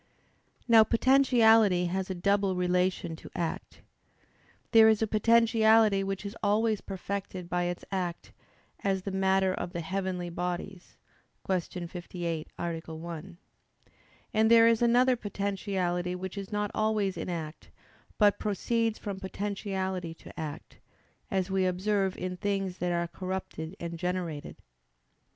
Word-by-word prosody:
Now, 225 -2 +8
potentiality 225 -6 +4
has 185 +2 -2
a 190 - -2
double 200 +1 +1
relation 180 -1 0
to - - -12
act. 170 -2 -4 0.9
There 225 -1 +8
is 220 0 +3
a - - +3
potentiality 220 -1 +4
which 195 +1 -4
is 200 - -5
always 215 +1 +2
perfected 190 -2 -5
by 175 0 0
its 175 0 -4
act: 180 -3 -3 0.5
as 195 -1 0
the 195 - -4
matter 190 0 +2
of 180 - -5
the 170 - -3
heavenly 185 0 -3
bodies 180 +2 -5 0.5
(Q. 180 -1 -2
58, 170 -2 -5
A. 170 -1 -2 0.2
1). 165 0 -8 1.0
And 220 +1 +4
there 230 0 +7
is 230 0 +3
another 245 +2 +4
potentiality 195 -4 -2
which 185 +1 -6
is 200 0 -6
not 210 -1 -1
always 215 -3 0
in - - -5
act, 160 -2 -6 0.5
but 205 -2 +4
proceeds 225 +2 0
from 200 -2 -5
potentiality 190 -3 -3
to - - -12
act; 155 -1 -7 0.5
as 190 0 -1
we 190 -1 +2
observe 190 +1 0
in 180 0 -4
things 195 -1 -2
that 180 0 0
are 170 0 0
corrupted 185 -1 -5
and 170 -1 -5
generated. 180 -4 -3
190 Hz, 135 wpm, -29 LUFS, 180-210 Hz, 1.0 s, Now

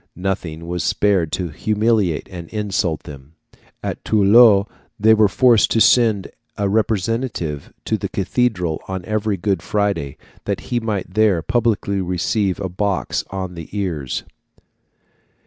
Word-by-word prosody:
Nothing 90 -4 -3
was 90 -1 -2
spared 95 -6 +1
to 90 -2 -2
humiliate 105 0 0
and 85 -3 -8
insult 100 -7 -2
them. 70 +2 -12 0.5
At - - -4
Toulouse 105 0 +6 0.3
they 110 +2 +6
were 110 -1 +5
forced 115 +2 +4
to 115 - +2
send 110 -4 +3 0.3
a 100 -1 0
representative 105 - -1
to - - -1
the - - -3
cathedral 90 -10 -1
on 95 -1 -5
every 110 -1 -1
Good 95 -1 -1
Friday, 100 -9 -1 0.3
that 100 -5 -2
he 120 - +2
might 105 -5 -3
there 100 -6 +3
publicly 115 -4 0
receive 90 +2 -1
a 95 - -2
box 95 +2 -1
on 95 -2 -5
the 85 -2 -9
ears. 80 -10 -3
100 Hz, 135 wpm, -20 LUFS, 90-110 Hz, 0.5 s, Toulouse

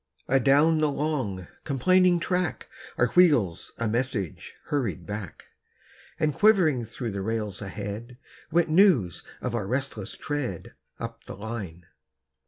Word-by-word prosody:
Adown 140 +5 +4
the 155 -1 +3
long, 130 - -2 0.2
complaining 180 +5 +3
track, 180 -1 -1 0.3
Our 120 - +3
wheels 135 - +3
a 115 - -1
message 115 - -2
hurried 105 - -2
back; 105 -2 -7 0.7
And 150 -1 +1
quivering 165 - +4
through 115 +1 -5
the 100 0 -4
rails 105 -2 -3
ahead, 105 +4 -6 0.3
Went 170 0 +3
news 155 - +4 0.2
of 125 - -3
our 105 -5 -2
resistless 125 -5 -3
tread, 135 - -4 0.3
Up - - -7
the - - -7
line. 100 -5 -6
125 Hz, 125 wpm, -26 LUFS, 105-155 Hz, 0.7 s, Adown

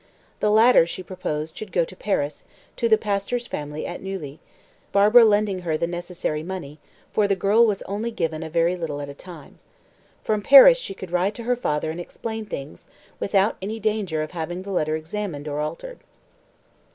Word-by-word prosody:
The 210 - +2
latter, 220 -4 +6
she 185 - -6
proposed, 160 -4 -5
should 215 -3 -8
go 170 -2 +2
to 185 - -13
Paris, 150 -8 -2 0.3
to 230 - 0
the 220 - +6
pastor's 210 +3 -2
family 150 -5 -5
at 175 - -6
Neuilly, 165 -7 -6 0.5
Barbara 210 +4 +7
lending 205 -3 +2
her 165 -3 -1
the 170 - 0
necessary 175 -3 -4
money, 160 -4 -7 0.3
for 210 -1 +3
the 200 - +2
girl 210 +5 +4
was 200 -2 -1
only 210 +4 -3
given 165 -8 -3
a 160 - -5
very 170 +2 +2
little 160 -5 -4
at 145 -1 -6
a - - -7
time. 160 -1 -13 0.6
From 215 -1 0
Paris 280 - +9
she 195 - -6
could 185 -2 -9
write 185 +3 +1
to 235 - -6
her 245 +2 +1
father 155 -9 -2
and 165 - -7
explain 220 +4 -6
things, 140 -4 -8 0.3
without 200 +1 +1
any 215 +4 -4
danger 205 -7 -1
of 155 - -7
having 175 +1 -5
the 200 - -7
letter 155 -4 0
examined 160 -2 -5
or 145 0 -3
altered. - - -5
185 Hz, 190 wpm, -23 LUFS, 160-210 Hz, 0.6 s, Paris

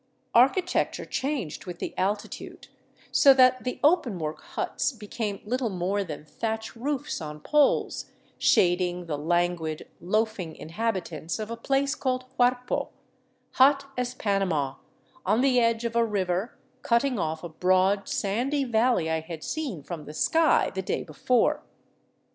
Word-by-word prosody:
Architecture 270 +10 +3
changed 255 - -3
with 175 -1 -6
the - - -5
altitude, 205 +2 -3 0.4
so 275 -1 +7
that 255 -1 +5
the 250 - -3
openwork 230 - +1
huts - - -2
be 220 -3 -11
came 205 -2 -3
little 245 +2 -1
more 195 +2 -1
than 155 -4 -7
thatch 220 +7 -4
roofs 275 - -3
on 150 -1 -6
poles, 295 - +2 0.3
shading 180 0 +2
the 160 -3 -2
languid, 165 0 -1
loafing 210 -3 -1
inhabitants 170 -4 -3
of 215 +1 -5
a - - -2
place 270 +3 0
called 255 -1 -2
Huarpo, 250 0 +1 0.6
hot 275 +1 +4
as 250 0 -2
Panama, 185 - 0 0.5
on 210 +5 +2
the 260 -2 +4
edge 230 0 +1
of 230 0 -2
a 235 - +4
river 195 0 -1 0.2
cutting 240 0 +1
off 160 -1 -2
a 175 - -5
broad, 185 +4 +2
sandy 250 +8 0
valley 235 -7 +2
I 160 0 0
had 160 -1 -8
seen 265 - -4
from 160 0 -7
the 150 - -9
sky 325 - +3
the 190 - -2
day 185 - -2
before. 225 - +1
210 Hz, 140 wpm, -27 LUFS, 175-250 Hz, 0.6 s, so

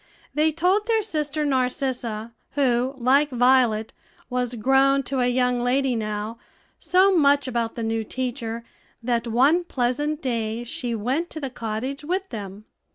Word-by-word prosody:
They 310 +1 +2
told 365 +7 +1
their 445 -2 +2
sister 305 -5 -1
Narcissa, 250 -4 -1 0.2
who, 260 -1 +1
like 270 +4 +3
Violet, 245 -4 +3 0.4
was 250 -1 -1
grown 270 +4 +3
to 265 +1 -2
a 245 - +2
young 250 -1 +1
lady 260 +1 +1
now, 215 +1 -4 0.4
so 370 +4 +4
much 285 -3 +4
about 235 -2 -2
the 230 - -4
new 225 0 -1
teacher, 235 -1 -4 0.4
that 235 0 0
one 275 +10 +3
pleasant 290 +1 -1
day 230 -4 -2
she 240 0 -4
went 260 +11 -1
to 315 - -6
the 270 -4 -4
cottage 240 +5 -4
with 375 +5 -2
them. 205 -1 -7
255 Hz, 150 wpm, -24 LUFS, 235-290 Hz, 0.4 s, so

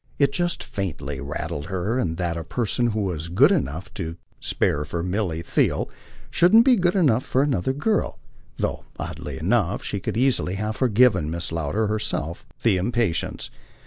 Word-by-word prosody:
It 140 -2 +3
just 175 +3 -1
faintly 75 -8 -4
rankled 70 +1 -4
in - - -10
her 100 +7 0
that 85 0 -1
a 85 - -4
person 120 +5 0
who 110 -2 -1
was 85 -5 -2
good 125 - +5
enough 95 - -1
and - - -24
to 80 +1 -4 0.2
spare 75 - 0
for 85 +3 -4
Milly 90 -3 -1
Theale - - +1 0.4
shouldn't 220 +7 +6
be 260 -2 +6
good 180 -3 +2
enough 135 - +3
for 130 - +1
another 130 -6 +1
girl; 180 +11 0 0.4
though, - - -2
oddly 70 -2 -5
enough, 100 - +1
she 100 - -2
could 105 - -3
easily 125 -7 +2
have 105 +2 -2
forgiven 110 - +3
Mrs. 85 +1 -2
Lowder 85 +7 0
herself 105 -6 -2 0.2
the 110 -5 +4
impatience. 105 -2 -1
100 Hz, 170 wpm, -24 LUFS, 85-125 Hz, 0.4 s, shouldn't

